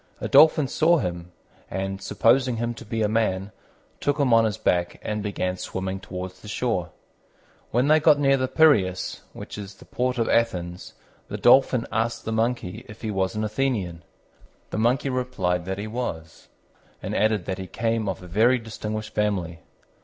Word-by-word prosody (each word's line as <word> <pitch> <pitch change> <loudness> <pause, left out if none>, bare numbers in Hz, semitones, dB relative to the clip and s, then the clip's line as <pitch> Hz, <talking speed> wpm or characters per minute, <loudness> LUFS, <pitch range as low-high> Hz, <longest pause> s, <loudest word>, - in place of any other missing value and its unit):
A - - -3
Dolphin 155 -2 +6
saw 170 +6 +3
him, 90 - -4 0.4
and, 95 0 -4
supposing 125 +4 +2
him 120 +1 -2
to 120 - -11
be 110 0 -2
a - - +3
man, 105 -3 0 0.5
took 145 +1 0
him 135 -4 +3
on 115 0 +6
his 105 -3 -1
back 90 -1 0
and 105 0 -2
began 95 -3 -2
swimming 95 +1 -4
towards 90 -1 -7
the - - -12
shore. 105 -5 -1 0.8
When 125 +4 +1
they 155 +1 +5
got 150 -1 +5
near 135 -1 +4
the 130 -1 0
Piræus, 110 - +2
which - - -8
is 100 -1 -8
the - - -16
port 125 0 -1
of 115 - +1
Athens, 90 -6 -1 0.3
the - - -5
Dolphin 125 -1 +5
asked 115 +1 -1
the 110 - -2
Monkey 110 -4 -1
if 105 +2 -12
he 110 - -2
was 95 +1 -1
an 105 - -1
Athenian. 105 -7 -2 0.7
The - - -2
Monkey 125 +4 +1
replied 95 -9 -1
that 95 0 -3
he 100 - -4
was, 105 -9 -5 0.6
and - - -3
added 105 -3 +1
that 95 0 -3
he 95 - -6
came 115 0 -1
of 95 -1 -5
a - - -10
very 115 +8 +3
distinguished 110 -1 -6
family. 95 -6 -1
110 Hz, 180 wpm, -24 LUFS, 95-125 Hz, 0.8 s, Dolphin